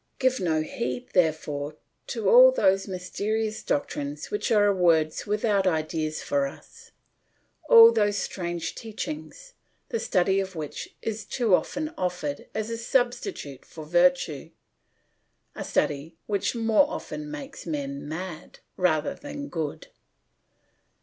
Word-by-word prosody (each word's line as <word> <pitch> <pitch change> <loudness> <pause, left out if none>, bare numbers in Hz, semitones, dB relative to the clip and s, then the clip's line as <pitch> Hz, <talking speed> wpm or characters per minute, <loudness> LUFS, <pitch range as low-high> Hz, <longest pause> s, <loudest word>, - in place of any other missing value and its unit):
Give 260 -1 +2
no 160 -4 +1
heed, 125 -4 -4
therefore, 155 -4 0 0.3
to - - -2
all - - +9
those 195 - +2
mysterious 210 +4 -2
doctrines 145 0 -3
which 210 - -1
are 205 -2 +5
words 165 -4 +2
without 205 -2 +1
ideas 155 -2 -1
for 140 -1 +1
us, 465 - -14 0.8
all 460 -1 +10
those 205 - +2
strange 175 -3 -3
teachings, 305 - -7 0.4
the 465 - -1
study 190 - +2
of 190 -1 -4
which 155 -3 -6
is 225 -1 -3
too 225 +1 0
often 305 - 0
offered 175 -6 -3
as 220 +1 -2
a 230 - -3
substitute 240 - -1
for 155 -2 -10
virtue, 175 -3 +2 1.0
a - - -5
study 150 +3 -1
which 200 +3 -1
more 225 +4 +4
often 300 -1 -6
makes 285 -2 -8
men 280 - -4
mad 170 0 -7 0.2
rather 160 -5 +1
than 285 0 -7
good. 155 -4 -4
190 Hz, 125 wpm, -26 LUFS, 160-245 Hz, 1.0 s, all